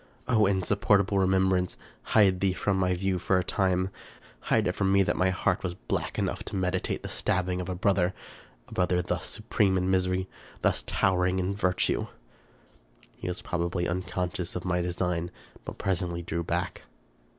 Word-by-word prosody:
O 110 -5 +4
insupportable 100 0 +2
remembrance! 95 -1 +2 0.2
hide 95 -4 +4
thee 95 -1 +2
from 95 +1 0
my 90 -1 +2
view 95 0 0
for 95 +2 +2
a 90 - +1
time; 95 0 +1 0.5
hide - - +1
it - - +2
from 95 0 0
me 100 0 +5
that - - 0
my 95 +1 +2
heart 95 - 0
was 90 -1 -3
black - - -3
enough - - -1
to - - -6
meditate 95 -1 -1
the - - -4
stabbing 90 0 0
of 90 - -6
a 90 - -2
brother! 95 -1 +2 0.6
a - - -12
brother 90 -1 +1
thus 90 0 -2
su 105 - -6
preme 95 -4 +3
in 90 +1 +1
misery; 95 0 +1 0.4
thus - - +2
towering 90 0 +2
in 95 +1 0
virtue! 95 -2 +1 1.1
He - - -7
was 90 +5 -4
probably 85 -2 -1
unconscious 90 0 -3
of 90 - -4
my 90 -1 +1
design, 90 -1 -1 0.4
but - - -7
pres 95 -2 0
ently 85 -1 -4
drew 85 +1 -2
back. - - -2
90 Hz, 175 wpm, -28 LUFS, 90-95 Hz, 1.1 s, me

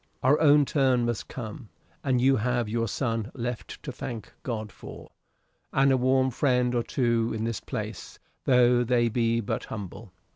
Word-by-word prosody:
Our 135 +4 +4
own 145 -1 +6
turn 130 -4 +2
must 120 -2 -2
come. 110 -2 -7 0.3
And 130 -4 +2
you 135 +2 +4
have 120 +1 0
your 115 +1 -1
son 115 +1 -2
left 120 -2 -5
to - - -5
thank 115 -5 -7
God 110 -4 -4
for, - - -11 0.6
and 135 0 +3
a - - +5
warm 130 +1 +2
friend 125 -1 +1
or 120 - +2
two 115 -1 0
in 110 - -3
this 115 -2 -2
place, - - -6 0.3
tho' 125 -1 +4
they 120 -1 +2
be 115 0 +1
but 100 - -3
humble." 105 0 -8
120 Hz, 170 wpm, -27 LUFS, 115-130 Hz, 0.6 s, own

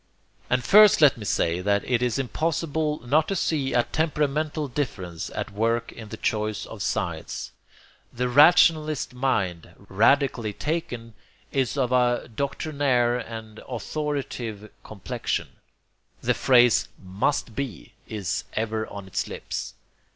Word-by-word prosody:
And 125 0 +1
first 210 - +7
let 150 -4 +6
me 110 - -8
say 85 -2 0
that 100 +1 +1
it 125 -2 +1
is 125 -2 0
impossible 155 +2 -1
not 150 +5 +3
to 195 - -1
see 145 -7 0
a 120 - +4
temperamental 150 0 -1
difference 95 - -4
at - - -4
work 115 +3 0
in 110 -2 -10
the 110 - -7
choice 105 -1 -1
of 110 - -9
sides. 90 - -3 0.6
The 125 +1 -1
rationalist 155 +1 +5
mind, 105 -10 -1
radically 115 +3 +2
taken, 125 - -4 0.4
is 135 0 0
of 130 -2 +1
a 125 -1 +2
doctrinaire 135 -3 0
and 110 -2 -8
authoritative 125 -5 -4
complexion: 100 -4 -4 0.7
the - - +1
phrase 125 -3 +4
'must 100 +6 -1
be' 135 -8 -5
is 100 -5 -3
ever 110 0 -2
on 100 -1 -8
its 95 - -3
lips. - - -6
125 Hz, 130 wpm, -25 LUFS, 110-145 Hz, 0.7 s, first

